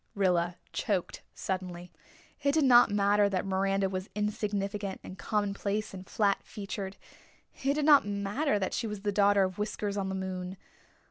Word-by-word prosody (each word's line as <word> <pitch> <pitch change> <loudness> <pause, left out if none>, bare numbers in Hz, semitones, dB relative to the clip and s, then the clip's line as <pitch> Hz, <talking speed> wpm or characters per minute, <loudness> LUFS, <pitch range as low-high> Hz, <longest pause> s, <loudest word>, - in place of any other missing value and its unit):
Rilla 180 -3 +2 0.2
choked 190 -4 -1
suddenly. 180 -2 -4 0.5
It 280 0 +2
did 315 -1 +3
not 245 -2 +7
matter 205 0 +3
that 190 -1 -1
Miranda 195 0 +1
was 190 0 -4
insignificant 205 -1 -2
and 185 - -8
commonplace 205 0 -2
and 185 -1 -9
flat 200 -2 +2
featured. 200 -1 -6 0.7
It 275 +1 +2
did 300 -1 0
not 290 -7 +7
matter 205 +6 0
that 190 -2 -2
she 230 - -1
was 210 -2 -5
the 205 0 0
daughter 200 0 +4
of 185 +1 -3
Whiskers 210 -1 -2
on 195 -1 -1
the 190 - -2
moon. 185 0 -4
200 Hz, 160 wpm, -30 LUFS, 190-210 Hz, 0.7 s, not